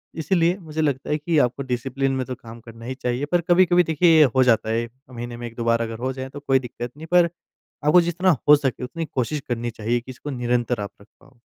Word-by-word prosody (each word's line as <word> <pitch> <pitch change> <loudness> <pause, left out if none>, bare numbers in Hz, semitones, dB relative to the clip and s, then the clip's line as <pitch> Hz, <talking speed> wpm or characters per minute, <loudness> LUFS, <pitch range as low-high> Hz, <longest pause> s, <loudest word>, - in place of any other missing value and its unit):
इसलिए 170 +2 +1
मुझे 160 -3 -4
लगता 140 -4 -1
है 150 - +1
कि 155 +2 -1
आपको 125 +1 0
डिसिप्लिन 135 +2 -2
में 130 -1 -2
तो 130 - -5
काम 115 -1 -12
करना 115 0 -12
ही 130 +2 -4
चाहिए। 125 +2 -2
पर 175 -1 +3
कभी-कभी 175 0 +5
देखिए 165 0 +4
ये 155 - +8
हो 130 - +5
जाता 115 -3 +2
है 115 +1 0 0.2
महीने 120 -1 -7
में 120 0 -6
1-2 115 0 -6
बार 115 0 +2
अगर 115 -1 -4
हो 130 - -2
जाए 130 0 -6
तो 145 - -9
कोई 135 -2 +2
दिक्कत 120 -1 -7
नहीं। 160 +2 -9
पर 175 -1 +6 0.6
आपको 155 +4 +6
जितना 175 +1 +2
हो 150 - +9
सके 135 -3 -2
उतनी 165 +6 -4
कोशिश 140 +1 -2
करनी 120 0 -2
चाहिए 115 +2 -1
कि 130 - -10
इसको 130 +3 -8
निरंतर 120 -3 -1
आप 100 -1 -5
रख 100 - -18
पाओ। 135 -2 -22
130 Hz, 240 wpm, -23 LUFS, 120-155 Hz, 0.6 s, हो